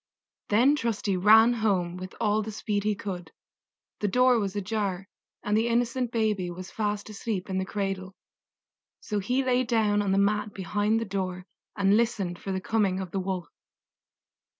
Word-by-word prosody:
Then 245 +8 +5
Trusty 225 -6 -1
ran 220 +5 +6
home 195 -6 0
with 185 +1 -8
all 215 -1 +2
the 215 +1 -5
speed 205 -1 -2
he 210 -1 +1
could. 180 -4 -6 0.7
The 210 - 0
door 250 +3 +4
was 200 -2 -2
ajar, 200 -2 -2 0.4
and 210 - 0
the 225 +2 +2
innocent 240 +1 0
baby 215 -6 0
was 185 +2 -8
fast 210 -1 -2
asleep 200 -2 -4
in 190 - 0
the 190 - -1
cradle; 195 -1 -3 0.8
so 210 -1 -3
he 250 +7 0
lay 255 0 +2
down 220 -3 +2
on 200 -2 0
the 195 - +2
mat 210 +1 +1
behind 205 +3 0
the 230 - -3
door 185 -2 -3 0.3
and 195 0 +4
listened 200 -7 -1
for 195 - -5
the 190 - -1
coming 195 -2 0
of 185 -2 -5
the 195 - -1
Wolf. 185 -2 -3
205 Hz, 175 wpm, -27 LUFS, 190-225 Hz, 0.8 s, ran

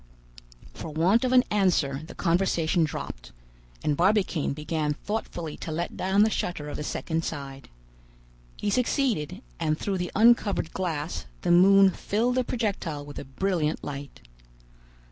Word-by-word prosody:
For 165 - -7
want 175 - +3
of 255 - +1
an 255 -1 +6
answer 175 -9 +2
the 160 - -11
conversation 170 -2 +1
dropped, 60 - -5 0.5
and 150 - +1
Barbicane 185 -2 +2
began 150 0 -2
thoughtfully 175 -5 -4
to 160 - -6
let 170 +3 -3
down 190 +2 +3
the 220 - +2
shutter 150 -7 -3
of - - -5
the - - -4
second 160 +2 -2
side. 135 -4 -6 0.9
He 205 - -1
succeeded; 240 - 0 0.2
and 155 0 0
through 195 +1 -2
the 180 -1 -3
uncovered 215 -6 +3
glass 165 - -3 0.2
the - - +2
moon 195 +2 +7
filled 225 +7 0
the 255 0 +1
projectile 195 -12 -3
with 145 -1 -8
a - - -7
brilliant 160 +2 -1
light. 140 -1 -7
175 Hz, 145 wpm, -27 LUFS, 150-200 Hz, 0.9 s, moon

